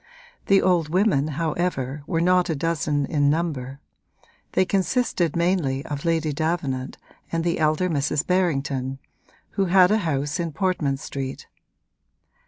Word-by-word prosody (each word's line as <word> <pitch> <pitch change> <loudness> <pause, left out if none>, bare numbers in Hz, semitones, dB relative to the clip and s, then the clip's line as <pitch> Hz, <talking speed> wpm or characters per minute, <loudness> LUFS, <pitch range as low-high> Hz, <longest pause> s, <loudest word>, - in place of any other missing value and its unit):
The 195 -1 +5
old 175 -4 +2
women 180 -5 +2
however 155 -4 -2
were 165 -3 0
not 180 +1 +3
a 160 - 0
dozen 150 -2 0
in 145 0 +2
number; 145 -4 -2 0.7
they 185 - +3
consisted 190 - 0
mainly 170 -6 0
of 145 +1 -5
Lady 165 -2 +1
Davenant 150 -4 -2 0.3
and 165 0 -1
the 170 -1 0
elder 155 +3 +2
Mrs. 150 -2 0
Berrington, 140 -7 0 0.5
who 195 -1 0
had 185 +1 +5
a 215 - +3
house 145 -3 -1
in 165 -2 -2
Portman 155 -6 0
Street. 135 -1 -6
160 Hz, 135 wpm, -24 LUFS, 140-180 Hz, 0.7 s, The